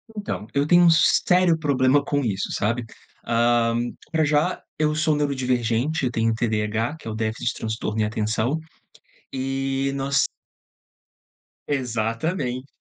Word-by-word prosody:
Então, 205 Hz, -, -4 dB
eu 140 Hz, +1 st, +1 dB
tenho 175 Hz, +1 st, +6 dB
um 170 Hz, -, +7 dB
sério 170 Hz, +2 st, +4 dB
problema 140 Hz, -2 st, +2 dB
com 145 Hz, -1 st, -1 dB
isso, 100 Hz, -4 st, -2 dB
sabe. 115 Hz, +3 st, -1 dB, 0.4 s
Hã, 115 Hz, 0 st, +2 dB, 0.4 s
pra 160 Hz, -1 st, +2 dB
já 150 Hz, 0 st, +1 dB, 0.2 s
eu 150 Hz, 0 st, +1 dB
sou 155 Hz, 0 st, +2 dB
neurodivergente, 130 Hz, 0 st, 0 dB
eu 125 Hz, -, 0 dB
tenho 115 Hz, -1 st, +1 dB
TDH, 110 Hz, +4 st, -1 dB
que -, -, -11 dB
é -, -, -3 dB
o 110 Hz, -, -5 dB
déficit 110 Hz, 0 st, -3 dB
de -, -, -3 dB
transtorno 110 Hz, -1 st, -3 dB
e -, -, +2 dB
atenção, 110 Hz, +6 st, -1 dB, 0.8 s
eh, 135 Hz, +1 st, -1 dB
nós 135 Hz, -1 st, +1 dB, 1.4 s
Exatamente. 125 Hz, +2 st, -2 dB
130 Hz, 135 wpm, -23 LUFS, 115-150 Hz, 1.4 s, um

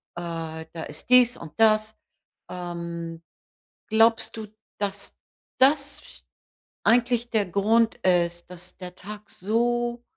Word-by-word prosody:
Äh, 165 Hz, -2 st, -5 dB
da 165 Hz, -1 st, -6 dB
ist -, -, -8 dB
dies 250 Hz, 0 st, +6 dB
und 155 Hz, -, -10 dB
das, 215 Hz, 0 st, +3 dB, 0.5 s
ähm. 170 Hz, -2 st, -6 dB, 0.7 s
Glaubst 225 Hz, +1 st, +3 dB
du, 220 Hz, -1 st, -7 dB, 0.3 s
dass 200 Hz, -1 st, -4 dB, 0.4 s
das 280 Hz, +1 st, +1 dB, 0.6 s
eigentlich 240 Hz, 0 st, +2 dB
der 215 Hz, -3 st, +1 dB
Grund 220 Hz, +5 st, +2 dB
ist, 175 Hz, -1 st, +1 dB
dass 180 Hz, 0 st, -9 dB
der 180 Hz, -1 st, -9 dB
Tag 205 Hz, +2 st, -10 dB
so 240 Hz, +4 st, -1 dB
210 Hz, 110 wpm, -25 LUFS, 175-235 Hz, 0.7 s, dies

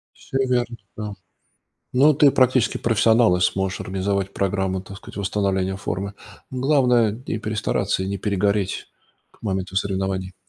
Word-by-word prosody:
Всё 135 Hz, -, -5 dB
верно, 120 Hz, -1 st, 0 dB, 0.2 s
да. 105 Hz, -1 st, -4 dB, 0.8 s
Но 140 Hz, +4 st, +6 dB
ты 140 Hz, 0 st, +5 dB
практически 130 Hz, -2 st, +3 dB
профессионал 115 Hz, -3 st, +4 dB
и -, -, -3 dB
сможешь 95 Hz, +1 st, 0 dB
организовать 95 Hz, +1 st, -2 dB
программу, 95 Hz, -1 st, -1 dB
так 100 Hz, +1 st, -10 dB
сказать, 95 Hz, -, -12 dB
восстановления 95 Hz, -1 st, 0 dB
формы. 100 Hz, +1 st, -4 dB, 0.4 s
Главное 125 Hz, -4 st, +3 dB
не 115 Hz, -1 st, -5 dB
перестараться 105 Hz, -3 st, -1 dB
и 95 Hz, -, -3 dB
не 100 Hz, -1 st, -3 dB
перегореть 100 Hz, 0 st, 0 dB, 0.4 s
к -, -, -28 dB
моменту 95 Hz, -2 st, -3 dB
соревнований. 95 Hz, -1 st, -1 dB
100 Hz, 135 wpm, -23 LUFS, 95-115 Hz, 0.8 s, Но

